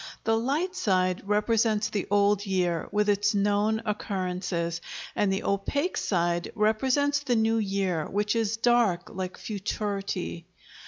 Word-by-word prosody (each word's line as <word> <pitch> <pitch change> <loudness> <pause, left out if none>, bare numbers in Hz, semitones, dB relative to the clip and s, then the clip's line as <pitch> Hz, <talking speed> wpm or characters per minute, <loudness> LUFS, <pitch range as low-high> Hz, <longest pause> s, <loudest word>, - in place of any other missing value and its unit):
The 225 0 +2
light 290 +11 -1
side 185 - +1
represents 215 +1 +2
the 205 - -2
old 205 0 +3
year, 180 -4 0
with 210 +1 +1
its 205 0 +2
known 205 +2 +1
occurrences, 180 -4 -2 0.3
and 205 -2 +2
the 195 +2 -1
opaque 280 - -1
side 175 -2 0
represents 260 +7 +2
the 265 -4 0
new 225 0 +2
year, 195 -6 -1
which 210 +3 0
is 225 -1 0
dark 225 -7 +2
like 185 -1 -5
futurity. 200 -4 -4
205 Hz, 130 wpm, -27 LUFS, 185-225 Hz, 0.3 s, old